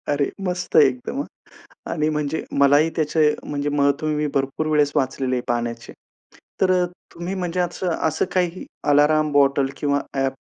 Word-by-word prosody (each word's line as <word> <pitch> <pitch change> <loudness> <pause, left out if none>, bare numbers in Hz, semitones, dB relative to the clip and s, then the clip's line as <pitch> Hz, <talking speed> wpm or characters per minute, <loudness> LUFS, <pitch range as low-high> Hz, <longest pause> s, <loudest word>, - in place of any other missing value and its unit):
अरे! 145 -1 +1 0.2
मस्त 180 0 -3
एकदम, 135 - +3
हां. - - -11
आणि 155 -2 0
म्हणजे 150 0 -2 0.2
मलाही 145 +3 +5
त्याचे 155 -1 +2
म्हणजे 145 0 -3
महत्त्व 145 +1 +1
मी 150 0 0
भरपूर 135 +3 -1
वेळेस 150 -2 +2
वाचलेले 130 -2 0
पाण्याचे, 120 -1 -3 0.7
तर 190 -1 +4
अ, - - +2 0.3
तुम्ही 175 +3 -5
म्हणजे 180 -1 -3
असं 180 +1 -1 0.2
असं 160 0 0
काही 180 0 0 0.2
अलार्म 150 +1 +4
बॉटल 140 -1 +3
किंवा 145 -1 +1
ॲप? 135 -1 0
150 Hz, 150 wpm, -22 LUFS, 140-160 Hz, 0.7 s, मलाही